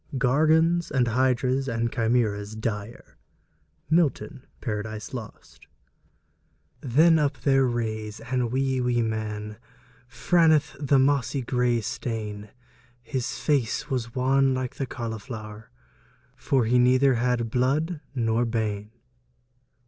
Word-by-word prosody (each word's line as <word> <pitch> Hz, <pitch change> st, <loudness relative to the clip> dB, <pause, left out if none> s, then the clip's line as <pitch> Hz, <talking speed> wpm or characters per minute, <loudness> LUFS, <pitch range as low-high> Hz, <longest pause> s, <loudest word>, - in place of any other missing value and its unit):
Gorgons, 160 Hz, +6 st, +3 dB
and 125 Hz, -4 st, +1 dB
hydras, 130 Hz, +2 st, +1 dB
and 115 Hz, -1 st, -1 dB
chimeras 110 Hz, -3 st, 0 dB
dire. 110 Hz, 0 st, -6 dB, 0.7 s
MILTON: 155 Hz, -5 st, 0 dB
Paradise 110 Hz, -1 st, -5 dB
Lost. 120 Hz, -4 st, -10 dB, 1.1 s
Then 160 Hz, +6 st, +4 dB
up 145 Hz, -2 st, 0 dB
there 135 Hz, -2 st, +3 dB
raise 110 Hz, -2 st, -3 dB
ane 125 Hz, 0 st, -2 dB
wee 130 Hz, +1 st, 0 dB
wee 120 Hz, -1 st, +1 dB
man 105 Hz, -1 st, -4 dB, 0.5 s
Franethe 160 Hz, +4 st, +2 dB
the 140 Hz, -1 st, +2 dB
moss 140 Hz, 0 st, +2 dB
gray 125 Hz, -1 st, +1 dB
stane; 110 Hz, -2 st, -5 dB, 0.5 s
His 125 Hz, 0 st, -3 dB
face 145 Hz, 0 st, -1 dB
was 115 Hz, -3 st, -3 dB
wan 135 Hz, +1 st, +2 dB
like 130 Hz, -1 st, -4 dB
the 135 Hz, -, -3 dB
collifloure, 110 Hz, -2 st, -7 dB, 0.7 s
For 130 Hz, -4 st, +1 dB
he 125 Hz, +2 st, +3 dB
nouthir 130 Hz, +1 st, +4 dB
had 120 Hz, -1 st, 0 dB
blude 145 Hz, +7 st, 0 dB
nor 115 Hz, -1 st, +1 dB
bane. 110 Hz, -3 st, -2 dB
125 Hz, 110 wpm, -25 LUFS, 110-135 Hz, 1.1 s, Then